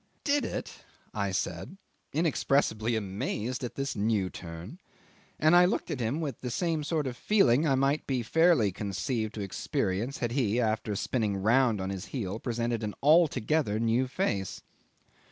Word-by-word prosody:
'"Did 285 Hz, -1 st, +2 dB
it?" -, -, -6 dB, 0.3 s
I 100 Hz, -2 st, -1 dB
said, 95 Hz, -, -3 dB, 0.3 s
inexpressibly 135 Hz, -7 st, +1 dB
amazed 110 Hz, +5 st, -3 dB
at 125 Hz, -, -5 dB
this 135 Hz, 0 st, -2 dB
new 105 Hz, -3 st, 0 dB
turn, 85 Hz, -, -9 dB, 0.6 s
and 155 Hz, +3 st, +4 dB
I 175 Hz, 0 st, +8 dB
looked 180 Hz, -, -1 dB
at 140 Hz, -, -3 dB
him 120 Hz, +6 st, -1 dB
with 145 Hz, -7 st, -4 dB
the 125 Hz, -, -3 dB
same 160 Hz, +3 st, -1 dB
sort 155 Hz, 0 st, -1 dB
of 125 Hz, -2 st, -3 dB
feeling 155 Hz, -, +3 dB
I 135 Hz, -, +3 dB
might 135 Hz, +3 st, +1 dB
be 130 Hz, -3 st, 0 dB
fairly 160 Hz, -, +4 dB
conceived 110 Hz, +4 st, -3 dB
to 105 Hz, -, -4 dB
experience 100 Hz, +5 st, -2 dB
had 120 Hz, -1 st, -2 dB
he, 120 Hz, -3 st, +1 dB
after 110 Hz, -2 st, 0 dB
spinning 105 Hz, -1 st, -1 dB
round 115 Hz, +2 st, +3 dB
on 95 Hz, +1 st, -3 dB
his 95 Hz, +1 st, -5 dB
heel, 110 Hz, -5 st, -4 dB
presented 120 Hz, -1 st, -2 dB
an 105 Hz, -2 st, -4 dB
altogether 150 Hz, -6 st, +3 dB
new 115 Hz, +3 st, +2 dB
face. 100 Hz, -, -2 dB
120 Hz, 160 wpm, -29 LUFS, 105-145 Hz, 0.6 s, I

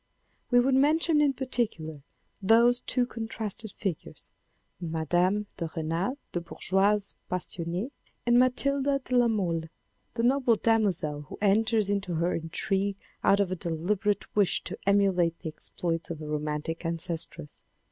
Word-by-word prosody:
We 245 Hz, -, +5 dB
would 260 Hz, +2 st, +3 dB
mention 300 Hz, +3 st, +4 dB
in 285 Hz, -2 st, +3 dB
particular 220 Hz, -, -2 dB, 0.4 s
those 235 Hz, +4 st, +5 dB
two 250 Hz, 0 st, +1 dB
contrasted 220 Hz, -2 st, -4 dB
figures, 190 Hz, -7 st, -5 dB, 0.5 s
Mme. 165 Hz, -2 st, -3 dB
de 180 Hz, +6 st, +2 dB, 0.2 s
R6nal 165 Hz, -, -2 dB
the 175 Hz, -, -2 dB
bourgeoise 195 Hz, +4 st, +1 dB, 0.2 s
passionee, 180 Hz, +5 st, -3 dB, 0.3 s
and 240 Hz, 0 st, +5 dB
Matilde 275 Hz, +2 st, +2 dB
de 250 Hz, -, -2 dB
la 245 Hz, -1 st, +5 dB
Mole 175 Hz, -7 st, 0 dB, 0.5 s
the 230 Hz, -, -1 dB
noble 250 Hz, -1 st, +4 dB
damozel 180 Hz, -11 st, +1 dB
who -, -, -8 dB
enters 215 Hz, +1 st, +2 dB
into 195 Hz, -4 st, -1 dB
her 170 Hz, +2 st, +1 dB
intrigue 195 Hz, +4 st, -1 dB, 0.3 s
out 200 Hz, -, +4 dB
of 195 Hz, -2 st, +1 dB
a -, -, 0 dB
deliberate 185 Hz, +5 st, -1 dB
wish 205 Hz, -3 st, +3 dB
to -, -, -5 dB
emulate 190 Hz, -4 st, +3 dB
the 160 Hz, -, -4 dB
exploits 165 Hz, +1 st, -4 dB
of 165 Hz, -2 st, -5 dB
a 155 Hz, -, -7 dB
romantic 150 Hz, +2 st, -3 dB
ancestress. 165 Hz, -2 st, -3 dB
200 Hz, 135 wpm, -28 LUFS, 165-235 Hz, 0.5 s, We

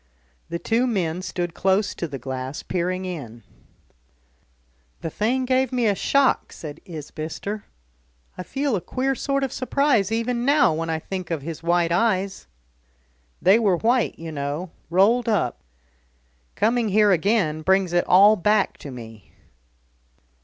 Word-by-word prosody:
The 170 Hz, -, -2 dB
two 230 Hz, +8 st, +1 dB
men 180 Hz, -7 st, -1 dB
stood 175 Hz, -2 st, -3 dB
close 195 Hz, +3 st, +1 dB
to 170 Hz, -, -4 dB
the 140 Hz, -3 st, -6 dB
glass, 130 Hz, +2 st, -5 dB
peering 185 Hz, +1 st, -2 dB
in. 120 Hz, -11 st, -7 dB, 1.6 s
"The 165 Hz, -, -4 dB
thing 250 Hz, -, 0 dB
gave 260 Hz, 0 st, +1 dB
me 250 Hz, -2 st, 0 dB
a 210 Hz, -, +3 dB
shock," 275 Hz, +7 st, +1 dB
said 155 Hz, -1 st, -9 dB
Isbister. 165 Hz, +5 st, -6 dB, 0.7 s
"I -, -, -6 dB
feel 270 Hz, +5 st, -1 dB
a 185 Hz, -, -2 dB
queer 265 Hz, +7 st, -1 dB
sort 275 Hz, +1 st, -1 dB
of 265 Hz, -, -2 dB
surprise 255 Hz, -6 st, +1 dB
even 235 Hz, +1 st, -1 dB
now 285 Hz, -, +4 dB
when 165 Hz, +1 st, -3 dB
I 160 Hz, -, 0 dB
think 185 Hz, +3 st, -6 dB
of 160 Hz, -5 st, -3 dB
his 160 Hz, 0 st, -6 dB
white 170 Hz, 0 st, +1 dB
eyes. 190 Hz, -, 0 dB, 1.0 s
They 190 Hz, +6 st, +6 dB
were 200 Hz, -6 st, +2 dB
white, 240 Hz, +5 st, +1 dB
you 165 Hz, 0 st, -7 dB
know, 145 Hz, +4 st, -4 dB, 0.2 s
rolled 215 Hz, +8 st, +3 dB
up. 185 Hz, -, 0 dB, 1.0 s
Coming 230 Hz, +1 st, +1 dB
here 210 Hz, +1 st, +4 dB
again 180 Hz, -4 st, +1 dB
brings 190 Hz, +1 st, +2 dB
it 175 Hz, -, +2 dB
all 200 Hz, +4 st, +7 dB
back 210 Hz, +1 st, +1 dB
to 145 Hz, -, -8 dB
me." 115 Hz, -5 st, -11 dB
190 Hz, 145 wpm, -23 LUFS, 165-230 Hz, 1.6 s, all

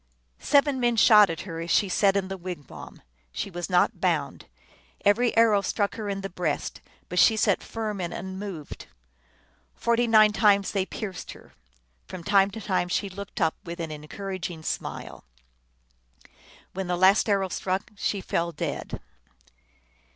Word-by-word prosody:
Seven 285 Hz, -, +3 dB
men 240 Hz, -1 st, +2 dB
shot 210 Hz, -2 st, +7 dB
at 165 Hz, -, -4 dB
her, 165 Hz, -4 st, -7 dB
as 165 Hz, +1 st, -5 dB
she 205 Hz, -, +3 dB
sat 195 Hz, +1 st, +2 dB
in 190 Hz, -1 st, -1 dB
the 195 Hz, -, -5 dB
wigwam. 175 Hz, -7 st, -9 dB, 0.3 s
She 200 Hz, -, -5 dB
was 175 Hz, +1 st, -5 dB
not 180 Hz, -1 st, +2 dB
bound. -, -, -1 dB, 0.6 s
Every 230 Hz, +4 st, +3 dB
arrow 220 Hz, -3 st, +5 dB
struck 200 Hz, +1 st, -1 dB
her 215 Hz, -2 st, -5 dB
in 195 Hz, 0 st, -3 dB
the 195 Hz, -, -4 dB
breast, 175 Hz, -5 st, -3 dB, 0.3 s
but 180 Hz, -, -1 dB
she 220 Hz, -, +5 dB
sat -, -, +2 dB
firm 215 Hz, -3 st, -4 dB
and 175 Hz, -1 st, -3 dB
unmoved. 190 Hz, -3 st, -7 dB, 0.9 s
Forty 235 Hz, +1 st, +1 dB
nine 215 Hz, -2 st, +6 dB
times 205 Hz, -2 st, +3 dB
they 195 Hz, -2 st, -1 dB
pierced 195 Hz, -5 st, -6 dB
her; -, -, -17 dB, 0.5 s
from 185 Hz, -2 st, -8 dB
time 195 Hz, +1 st, +4 dB
to 220 Hz, +2 st, -8 dB
time 185 Hz, -3 st, 0 dB
she 195 Hz, +3 st, -1 dB
looked 200 Hz, +3 st, -8 dB
up 160 Hz, -3 st, +2 dB
with 170 Hz, +1 st, -7 dB
an 165 Hz, -2 st, -4 dB
encouraging 170 Hz, +2 st, -6 dB
smile. -, -, -5 dB, 1.5 s
When 190 Hz, 0 st, -4 dB
the 180 Hz, 0 st, -1 dB
last 190 Hz, +4 st, +4 dB
arrow 195 Hz, -2 st, +1 dB
struck 190 Hz, +3 st, -3 dB
she 200 Hz, 0 st, -2 dB
fell 170 Hz, -1 st, -1 dB
dead. 150 Hz, -, -5 dB
195 Hz, 160 wpm, -26 LUFS, 180-210 Hz, 1.5 s, shot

